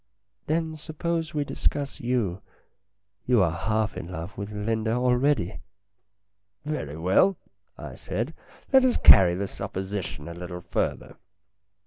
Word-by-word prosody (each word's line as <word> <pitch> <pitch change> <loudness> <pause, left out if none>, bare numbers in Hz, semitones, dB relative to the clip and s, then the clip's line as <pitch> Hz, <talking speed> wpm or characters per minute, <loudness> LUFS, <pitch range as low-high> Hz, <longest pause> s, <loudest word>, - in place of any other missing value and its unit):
"Then 160 0 -1
suppose 160 +1 -3
we 145 - +1
discuss 140 0 -2
you. 115 -7 -1 0.9
You 120 -6 +5
are 85 - +2
half 110 +5 -1
in 85 - -6
love 85 +2 -6
with 100 +1 -6
Linda 110 +2 -1
already." 125 -4 +1 0.5
" 100 +2 -49
Very 80 - -4
well," 95 - +3 0.4
I - - -8
said, 120 +9 -4 0.2
" - - -26
let 265 -1 +7
us 255 -1 +3
carry 90 -2 +8
the 100 +2 -2
supposi 95 0 -4
tion 75 -3 -7
a 85 - -6
little 90 0 -7
further. - - -3
105 Hz, 140 wpm, -26 LUFS, 95-145 Hz, 0.9 s, carry